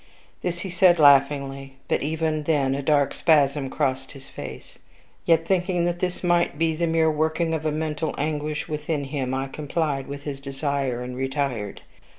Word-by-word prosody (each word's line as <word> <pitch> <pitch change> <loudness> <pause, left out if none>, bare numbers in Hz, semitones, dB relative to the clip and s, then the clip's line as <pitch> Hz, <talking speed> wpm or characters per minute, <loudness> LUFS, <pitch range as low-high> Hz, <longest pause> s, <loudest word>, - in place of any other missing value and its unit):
This 175 -1 -3
he 190 - -5
said 180 0 +5
laughingly; 140 -2 +3
but - - +1
even 155 +1 -1
then 140 -4 +2
a 140 - -2
dark 145 -1 +2
spasm 145 -3 +2
crossed 135 -1 -2
his 135 -1 -13
face. - - -9 0.5
Yet, 165 -1 +4
thinking 180 -1 +1
that 175 0 -1
this 180 0 -2
might 175 -4 +2
be 160 0 +1
the 170 +1 0
mere 160 -1 +3
working 160 +2 0
of 155 -1 -1
mental 155 0 -2
anguish 150 0 -2
within 150 -1 -2
him, 135 -2 -3
I 135 +1 -2
complied 145 -1 -2
with 140 0 -7
his 140 -2 -5
desire, 135 -2 -2
and 125 0 -6
retired. 135 -5 -2
150 Hz, 165 wpm, -24 LUFS, 135-160 Hz, 0.5 s, said